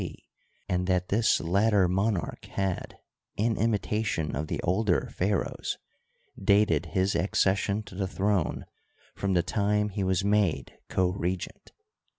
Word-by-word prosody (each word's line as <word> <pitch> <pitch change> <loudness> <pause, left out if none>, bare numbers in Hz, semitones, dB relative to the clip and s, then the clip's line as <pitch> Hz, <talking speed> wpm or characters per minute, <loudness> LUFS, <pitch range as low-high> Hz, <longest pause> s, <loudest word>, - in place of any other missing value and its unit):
c, - - -6 0.5
and 90 0 0
that 90 -1 +1
this 110 +3 +3
latter 100 +3 +3
monarch 95 0 -1
had, 95 -2 -3 0.4
in 110 +2 +1
imitation 105 -6 0
of 75 +3 -3
the - - -3
older 95 0 +1
pharaohs, 100 +2 -1 0.7
dated 100 -6 +3
his 95 +4 +1
accession 100 +3 +1
to 100 - -13
the 95 0 -2
throne 95 -2 0 0.5
from 100 -1 -1
the 90 -2 +3
time 105 0 +1
he 100 0 -3
was 95 +1 +1
made 100 -10 +1
co 95 -1 +2
regent. 90 -1 -4
95 Hz, 135 wpm, -28 LUFS, 90-105 Hz, 0.7 s, this